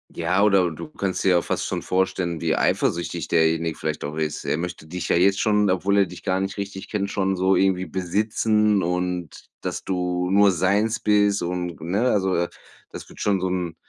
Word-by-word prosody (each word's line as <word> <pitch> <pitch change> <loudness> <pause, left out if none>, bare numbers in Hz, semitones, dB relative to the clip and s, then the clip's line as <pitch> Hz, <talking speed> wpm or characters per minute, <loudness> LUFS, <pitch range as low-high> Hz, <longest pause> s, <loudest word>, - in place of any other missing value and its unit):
Ja, 90 +4 +1
oder 95 -4 +4
du 80 - -8
kannst 100 -10 -3
dir - - +3
ja 90 -1 +4
fast - - -2
schon - - -3
vorstellen, 90 -2 -1
wie - - +1
eifersüchtig 85 0 0
derjenige 80 0 +2
vielleicht 75 -1 -3
auch 75 +1 -5
ist. 80 -2 -3
Er - - 0
möchte 85 -1 -5
dich 90 +2 -5
ja - - +3
jetzt 95 +3 +3
schon, 105 -2 +2
obwohl 95 +2 +1
er 100 - +4
dich 90 -1 -11
gar 95 -1 0
richtig 95 0 -5
kennt, 100 -2 -2
schon 95 -1 0
so 95 +1 +2
irgendwie 95 -1 +2
besitzen 105 +2 +1
und, 90 -1 -3
dass - - -4
du 90 -1 -1
nur 100 +1 +5
seins 100 +6 +1
bist 105 -2 +2
und, 90 0 -3
ne? 100 +10 0
Also, 95 -3 +1 0.5
das - - -9
würde - - -12
schon 100 -2 +1
so 95 - 0
'n 90 -3 -3
95 Hz, 195 wpm, -23 LUFS, 85-100 Hz, 0.5 s, nur